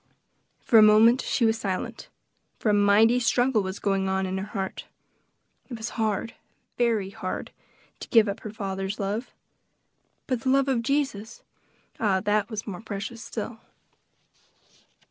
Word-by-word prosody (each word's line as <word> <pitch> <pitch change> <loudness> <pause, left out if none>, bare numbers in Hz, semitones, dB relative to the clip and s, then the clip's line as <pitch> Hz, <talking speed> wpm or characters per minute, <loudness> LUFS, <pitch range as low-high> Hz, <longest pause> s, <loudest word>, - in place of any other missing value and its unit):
For 225 - +5
a - - +8
moment 220 +4 +6
she 235 - 0
was 225 0 +1
silent, 190 -4 -4 0.5
for 220 - -1
a - - +4
mighty 205 +4 +4
struggle 245 -1 +2
was 190 0 -4
going 195 -1 0
on 190 0 0
in 190 +1 -3
her 195 - -5
heart. 195 -3 -5 0.8
It 240 - -6
was 220 +2 -4
hard, 220 0 -2 0.4
very 225 -5 0
hard, - - -5 0.5
to - - -8
give 225 -3 +5
up 200 - -3
her 215 - -7
father's 195 -2 -4
love. 210 +5 -3 0.9
But 255 -3 -2
the 260 - -1
love 275 +1 +3
of 260 -4 +1
Jesus! 235 -4 -2 0.6
ah, 200 -4 +2
that 210 +1 +1
was 215 -2 -5
more 200 -2 -6
precious 220 +2 -6
still! 225 0 -6
215 Hz, 150 wpm, -26 LUFS, 200-235 Hz, 0.9 s, a